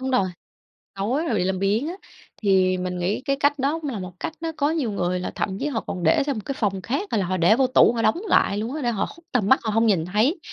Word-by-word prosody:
đúng 260 Hz, 0 st, -2 dB
rồi, 200 Hz, -7 st, +2 dB, 0.7 s
tối 240 Hz, +11 st, -1 dB
rồi 235 Hz, -, 0 dB
bị 180 Hz, -, +1 dB
làm 190 Hz, 0 st, -1 dB
biếng 210 Hz, +9 st, +1 dB
á. 345 Hz, -, -3 dB, 0.5 s
Thì 190 Hz, -3 st, +3 dB
mình 180 Hz, 0 st, -3 dB
nghĩ 185 Hz, +7 st, -1 dB
cái 275 Hz, 0 st, 0 dB
cách 285 Hz, 0 st, +1 dB
đó 285 Hz, +5 st, 0 dB
cũng 295 Hz, -, -3 dB
là 215 Hz, -, -4 dB
một 185 Hz, 0 st, -7 dB
cách -, -, -4 dB
nó 330 Hz, -1 st, -2 dB
có 290 Hz, +2 st, +1 dB
nhiều 285 Hz, -9 st, -1 dB
người 180 Hz, -2 st, -1 dB
là 180 Hz, -, -4 dB
thậm 190 Hz, -1 st, -2 dB
chí -, -, -1 dB
họ 260 Hz, -6 st, -1 dB
còn 180 Hz, -, -4 dB
để 160 Hz, +10 st, +4 dB
sang 280 Hz, -3 st, -2 dB
một 215 Hz, -, -4 dB
cái 275 Hz, -, -3 dB
phòng 195 Hz, -4 st, 0 dB
khác, 275 Hz, -, -2 dB
hay 220 Hz, -, +1 dB
là 190 Hz, -, 0 dB
họ 185 Hz, +1 st, -1 dB
để 175 Hz, +6 st, +5 dB
vô 260 Hz, +1 st, +3 dB
tủ 255 Hz, -1 st, +5 dB
họ 230 Hz, -, -1 dB
đóng 280 Hz, -, +2 dB
lại 200 Hz, -, +3 dB
luôn 225 Hz, +6 st, -3 dB
á, 310 Hz, -, -4 dB
để 240 Hz, -, 0 dB
họ 205 Hz, -3 st, -1 dB
khuất 335 Hz, -, -13 dB
tầm 220 Hz, -6 st, +1 dB
mắt 265 Hz, -, +5 dB
họ 220 Hz, -, -2 dB
hông 225 Hz, +2 st, +2 dB
nhìn 185 Hz, -7 st, +2 dB
thấy, 220 Hz, -, +1 dB
220 Hz, 300 wpm, -23 LUFS, 190-275 Hz, 0.7 s, để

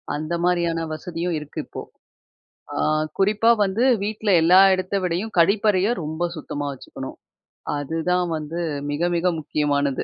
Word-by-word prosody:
அந்த 155 Hz, +3 st, -4 dB
மாரியான 170 Hz, -2 st, +1 dB
வசதியும் 170 Hz, +2 st, -3 dB
இருக்கு 150 Hz, 0 st, -6 dB
இப்போ. -, -, -8 dB, 0.9 s
ஆ, -, -, -5 dB, 0.4 s
குறிப்பா 210 Hz, +4 st, +3 dB
வந்து 200 Hz, +5 st, 0 dB, 0.2 s
வீட்ல 215 Hz, +1 st, -2 dB
எல்லா 180 Hz, +3 st, +6 dB
எடத்த 185 Hz, +1 st, -2 dB
விடயும், 180 Hz, +5 st, -2 dB
கழிப்பறைய 200 Hz, +2 st, +3 dB, 0.2 s
ரொம்ப 160 Hz, +3 st, -2 dB
சுத்தமா 145 Hz, -2 st, -5 dB
வச்சுக்கணும். 130 Hz, -, -9 dB, 0.6 s
அதுதான் 165 Hz, +5 st, -1 dB
வந்து 155 Hz, +3 st, -5 dB, 0.3 s
மிக, 170 Hz, +4 st, 0 dB
மிக 180 Hz, +2 st, +2 dB
முக்கியமானது.. 145 Hz, -2 st, 0 dB
170 Hz, 125 wpm, -23 LUFS, 155-190 Hz, 0.9 s, எல்லா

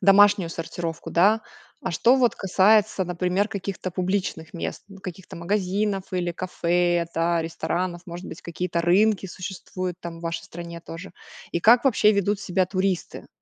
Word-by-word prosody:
домашнюю 200 Hz, -2 st, +6 dB
сортировку, 165 Hz, 0 st, -5 dB
да? 205 Hz, +6 st, +4 dB, 0.4 s
А -, -, -2 dB
что 240 Hz, +10 st, +4 dB
вот 245 Hz, -4 st, +3 dB
касается, 195 Hz, +1 st, +3 dB
например, 180 Hz, +4 st, 0 dB
каких-то 195 Hz, -1 st, -4 dB
публичных 180 Hz, -3 st, -2 dB
мест- 170 Hz, -, -5 dB
ну, 195 Hz, -, -12 dB
каких-то 185 Hz, -1 st, -8 dB
магазинов 195 Hz, +2 st, -1 dB
или 175 Hz, -1 st, -1 dB
кафе, 175 Hz, -1 st, +1 dB
да, 170 Hz, 0 st, +2 dB
ресторанов. 175 Hz, +2 st, -3 dB
Может 175 Hz, +1 st, -7 dB
быть, 160 Hz, -, -9 dB
какие-то 170 Hz, 0 st, -2 dB
рынки 195 Hz, +4 st, +3 dB
существуют 185 Hz, 0 st, -5 dB
там, 170 Hz, -1 st, -7 dB
в -, -, -13 dB
вашей 165 Hz, 0 st, -3 dB
стране 170 Hz, 0 st, -8 dB
тоже? 165 Hz, +3 st, -9 dB, 0.4 s
И 170 Hz, -, 0 dB
как 240 Hz, +7 st, +6 dB
вообще 215 Hz, -4 st, +5 dB
ведут 200 Hz, 0 st, +1 dB
себя 185 Hz, -1 st, +1 dB
туристы? 185 Hz, -1 st, -2 dB
185 Hz, 150 wpm, -24 LUFS, 170-200 Hz, 0.4 s, домашнюю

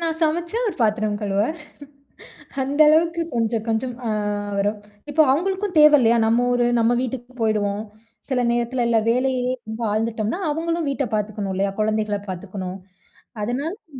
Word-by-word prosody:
நான் 325 Hz, -1 st, -1 dB
சமைச்சா 335 Hz, +6 st, 0 dB
அவரு 425 Hz, -6 st, -1 dB
பாத்திரம் 215 Hz, -1 st, +1 dB
கழுவுவாரு. 205 Hz, +7 st, 0 dB, 1.1 s
அந்த 275 Hz, +3 st, -2 dB
அளவுக்கு 335 Hz, +2 st, +3 dB
கொஞ்சம், 230 Hz, -1 st, 0 dB
கொஞ்சம் 235 Hz, +2 st, -1 dB
அ -, -, 0 dB, 0.5 s
வரும். 205 Hz, +2 st, 0 dB, 0.3 s
இப்போ 310 Hz, +2 st, +3 dB
அவுங்களுக்கும் 380 Hz, +5 st, -1 dB
தேவ 300 Hz, 0 st, +8 dB
இல்லயா! 235 Hz, -1 st, +4 dB
நம்ம 230 Hz, +2 st, +3 dB
ஊரு, 245 Hz, -1 st, +2 dB
நம்ம 230 Hz, +1 st, +3 dB
வீட்டுக்கு 255 Hz, 0 st, -5 dB
போயிடுவோம். 210 Hz, -2 st, 0 dB, 0.5 s
சில 250 Hz, -2 st, +1 dB
நேரத்தில 240 Hz, +1 st, 0 dB
எல்லா 230 Hz, -1 st, +3 dB
வேலையிலே 255 Hz, 0 st, 0 dB, 0.4 s
ஆழ்ந்துட்டம்ன்னா, 220 Hz, -, -1 dB
அவுங்களும் 330 Hz, 0 st, -1 dB
வீட்ட 275 Hz, 0 st, -1 dB
பார்த்துக்கணும் 205 Hz, -2 st, -2 dB
இல்லயா! 195 Hz, +1 st, 0 dB
குழந்தைகள 215 Hz, -1 st, 0 dB
பார்த்துக்கணும், 185 Hz, 0 st, -5 dB, 0.7 s
அதனால 270 Hz, +9 st, -2 dB
ம்ப 440 Hz, 0 st, -33 dB
240 Hz, 140 wpm, -22 LUFS, 215-295 Hz, 1.1 s, தேவ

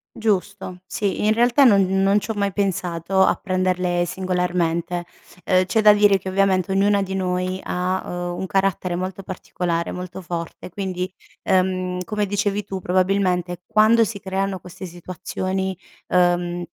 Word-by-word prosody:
Giusto. 200 Hz, -3 st, -2 dB
Sì, 200 Hz, +1 st, -2 dB
in 215 Hz, -, +4 dB
realtà 240 Hz, +4 st, +4 dB
non 205 Hz, -6 st, +6 dB, 0.2 s
non 200 Hz, +1 st, +4 dB
c'ho 220 Hz, +2 st, -4 dB
mai 200 Hz, -1 st, -1 dB
pensato, 185 Hz, -2 st, 0 dB
a -, -, +4 dB
prenderle 185 Hz, -1 st, 0 dB
singolarmente. 175 Hz, -1 st, -1 dB, 0.4 s
Uhm, 185 Hz, 0 st, +4 dB
c'è 220 Hz, +4 st, +1 dB
da 210 Hz, -, +8 dB
dire 205 Hz, -1 st, +4 dB
che 190 Hz, -, -6 dB
ovviamente 190 Hz, -1 st, +2 dB
ognuna 200 Hz, +1 st, +3 dB
di 190 Hz, 0 st, -3 dB
noi 185 Hz, 0 st, -1 dB
ha, 180 Hz, +1 st, -1 dB
uhm, 175 Hz, 0 st, -4 dB
un -, -, -2 dB
carattere 190 Hz, -2 st, 0 dB
molto 185 Hz, +2 st, -4 dB
particolare, 175 Hz, -2 st, -3 dB
molto 180 Hz, +1 st, -6 dB
forte 170 Hz, 0 st, -6 dB
quindi, 185 Hz, 0 st, -4 dB, 0.3 s
ehm, 185 Hz, -1 st, 0 dB
come 210 Hz, +2 st, -2 dB
dicevi 205 Hz, +1 st, 0 dB
tu 195 Hz, -1 st, -5 dB
probabilmente 180 Hz, -1 st, 0 dB
quando 220 Hz, +2 st, +5 dB
si 210 Hz, -1 st, -5 dB
creano 195 Hz, 0 st, -2 dB
queste 180 Hz, +2 st, -10 dB
situazioni, 185 Hz, +2 st, -4 dB, 0.3 s
uhm, 175 Hz, -1 st, +2 dB
185 Hz, 145 wpm, -22 LUFS, 180-195 Hz, 0.4 s, da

